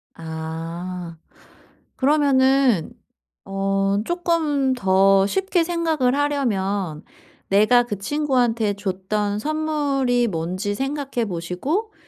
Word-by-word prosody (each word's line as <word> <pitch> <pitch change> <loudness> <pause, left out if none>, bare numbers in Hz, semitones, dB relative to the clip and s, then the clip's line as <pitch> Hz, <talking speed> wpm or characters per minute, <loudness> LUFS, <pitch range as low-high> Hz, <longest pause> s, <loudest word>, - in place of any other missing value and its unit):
아. 165 +2 -6 0.8
그러면은 265 - +3 0.5
어 195 0 0
쪼끔 320 -6 0
더 195 -3 +4
쉽게 380 - +1
생각을 320 -7 0
하려면 205 - -1 0.5
내가 215 +5 +5
그 210 -5 -5
친구한테 240 -4 0
줬던 200 +1 -2
선물이 285 -4 0
뭔지 185 +3 -3
생각해 270 -2 -2
보시고 195 - -3
235 Hz, 185 characters per minute, -22 LUFS, 190-285 Hz, 0.8 s, 내가